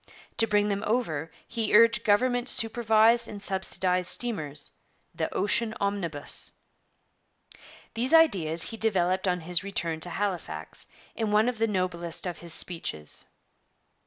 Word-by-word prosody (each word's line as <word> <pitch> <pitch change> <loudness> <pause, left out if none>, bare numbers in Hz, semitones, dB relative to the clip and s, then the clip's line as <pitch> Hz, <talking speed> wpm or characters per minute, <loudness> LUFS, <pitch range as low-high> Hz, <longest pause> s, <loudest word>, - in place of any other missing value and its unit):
To 225 - +3
bring 210 -1 +2
them 200 0 -2
over 165 -10 -1 0.2
he 225 -2 0
urged 230 0 +5
government 245 +4 +2
supervised 225 0 +3
and 205 - -8
subsidized 190 -2 -1
steamers, 155 -12 -3 0.4
'the - - -3
Ocean 220 +3 +1
omnibus.' 190 -7 -3 1.4
These 240 +3 0
ideas 185 - +4
he 225 - -2
developed 190 -4 +1
on 180 -1 0
his 175 +2 +1
return 170 -5 -2
to 175 - -3
Halifax 175 - -4 0.3
in 220 -2 -1
one 210 +2 +3
of 245 -3 -2
the 225 - +2
noblest 180 -4 -2
of 175 -2 -4
his 170 -1 -9
speeches. 160 - -3
200 Hz, 130 wpm, -27 LUFS, 175-225 Hz, 1.4 s, urged